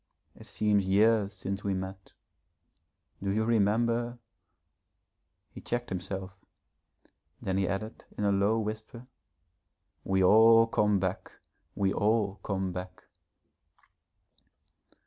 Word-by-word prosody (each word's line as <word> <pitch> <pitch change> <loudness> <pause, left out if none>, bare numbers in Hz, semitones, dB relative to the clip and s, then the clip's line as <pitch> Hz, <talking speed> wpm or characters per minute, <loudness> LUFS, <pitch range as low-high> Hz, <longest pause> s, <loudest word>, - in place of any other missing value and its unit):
It - - -14
seems 105 -2 +1
years 105 +1 +3
since 100 +1 -5
we 100 -1 -1
met. 95 +1 -7 1.1
Do 100 - -2
you 105 +3 +1
remember 115 +2 +1 0.7
?' - - -52
He - - -10
checked 120 0 -3
himself; 95 +1 -4 1.1
then 95 0 -2
he 95 - +1
added 100 +5 -5
in - - -2
a 100 - +3
low 100 +3 +2
whisper, 110 +3 -6 1.0
'We 95 0 +1
all 115 +4 +7
come 105 -2 +1
back, 95 0 -3 0.4
we 100 -1 +1
all 105 -2 +1
come 95 -2 -2
back.' 90 0 -8
100 Hz, 110 wpm, -29 LUFS, 95-110 Hz, 1.1 s, all